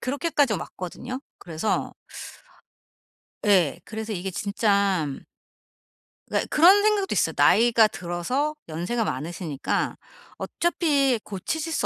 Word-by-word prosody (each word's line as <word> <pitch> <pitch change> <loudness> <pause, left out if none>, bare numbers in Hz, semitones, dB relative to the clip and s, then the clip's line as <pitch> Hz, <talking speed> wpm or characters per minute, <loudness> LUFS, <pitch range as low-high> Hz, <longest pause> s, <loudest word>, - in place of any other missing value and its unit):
그렇게까지 285 -1 0
왔거든요. 245 +8 -6 0.2
그래서 165 +5 -2 1.5
예 180 -6 +3
그래서 220 0 -5
이게 190 +1 -4
진짜 200 -3 +1 1.2
그러니까 - - -1
그런 370 +6 +6
생각도 415 -2 +1
있어요. - - +1
나이가 230 -1 +5
들어서 210 - -2
연세가 175 +9 -2
많으시니까 165 -5 -3 0.4
어차피 285 -8 +1
고치실 310 - -4
수 - - 0
220 Hz, 270 characters per minute, -25 LUFS, 180-285 Hz, 1.5 s, 그런